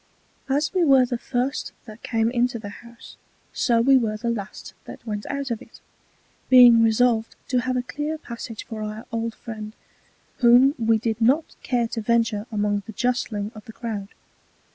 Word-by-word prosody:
As 290 +5 0
we 365 -2 +2
were 270 -4 +5
the 245 -1 -3
first 260 +4 -2
that 215 0 -12
came 225 0 0
into 245 -1 0
the 210 -2 -8
House, 235 +2 -14 0.4
so 235 -2 +2
we 270 +3 +5
were 220 -4 -1
the 235 +2 -2
last 210 -3 -7
that - - -11
went 210 -2 -4
out 280 -2 -3
of 230 - -3
it; - - -15 0.7
being 245 -3 +8
resolved 225 0 +2
to 255 - +2
have 255 +1 -1
a 250 - -1
clear 295 +4 -4
Passage 235 -5 -8
for 220 -1 -7
our 215 +1 -6
old 230 -1 -3
Friend, 215 -1 -8 0.6
whom 250 +2 +6
we 225 -1 +3
did 225 0 -3
not 270 +8 +2
care 240 -3 0
to 225 - -4
venture 230 -1 0
among 205 -1 0
the 220 - -8
justling 220 -3 -2
of 215 - -12
the 225 - -11
Crowd. 220 -4 -5
235 Hz, 180 wpm, -23 LUFS, 220-250 Hz, 0.7 s, being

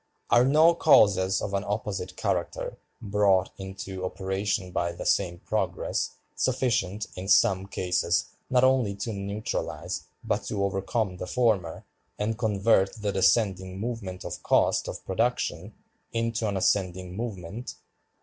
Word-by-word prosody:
Are 120 - +6
no 155 +6 +6
causes 95 - +4
of 100 - -3
an 100 0 0
opposite 100 -3 -3
character, - - -2 0.3
brought 100 -2 +2
into 95 -1 -6
operation 95 +1 -2
by 85 -1 -1
the - - -7
same 85 0 +1
progress, - - -1 0.3
sufficient 110 -6 0
in 90 +1 -6
some 95 -2 +4
cases 90 -2 0 0.2
not 125 0 +3
only 130 -6 +3
to 105 +3 -4
neutralize 100 +2 -4 0.2
but 105 - -1
to 100 -1 -2
overcome 95 0 -1
the 90 - -5
former, 110 -9 0 0.3
and 110 +2 -1
convert 105 -3 +2
the 105 -3 -2
descending 95 -1 +2
movement 105 -5 -4
of - - -5
cost - - +2
of - - -7
production - - -1 0.4
into 115 -1 -1
an 100 -1 -1
ascending 90 -1 0
movement? 110 0 -5
100 Hz, 130 wpm, -27 LUFS, 95-115 Hz, 0.4 s, Are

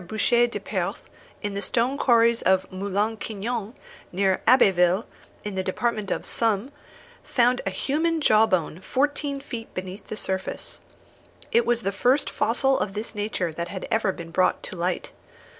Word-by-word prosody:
Boucher 225 +5 +2
de 235 - -5
Perthes, - - -3 0.4
in 205 -1 -2
the 200 - -3
stone 240 +5 +1
quarries 235 -4 +4
of 190 0 +3
Moulin 200 +3 -1
Quignon, 220 +2 -4 0.4
near 190 +1 +1
Abbeville, 190 -5 +5 0.4
in 210 - -4
the 190 - -1
department 210 +2 -1
of - - -2
Somme, 225 +2 0 0.5
found 245 0 +2
a - - +3
human 315 - 0
jawbone 215 - +3
fourteen 280 +6 -1
feet 235 -4 -7
beneath 185 +2 -6
the 215 - -5
surface. 190 -2 -4 0.7
It 470 0 +3
was 235 -1 +1
the 195 - 0
first 250 +8 +2
fossil 265 +4 +2
of 195 - -2
this 215 +2 -4
nature 205 -5 -2
that 170 +2 -4
had 190 +1 -6
ever 220 -3 +2
been 170 -2 -9
brought 185 +2 +2
to - - -7
light. 175 +1 -2
215 Hz, 160 wpm, -25 LUFS, 190-240 Hz, 0.7 s, Abbeville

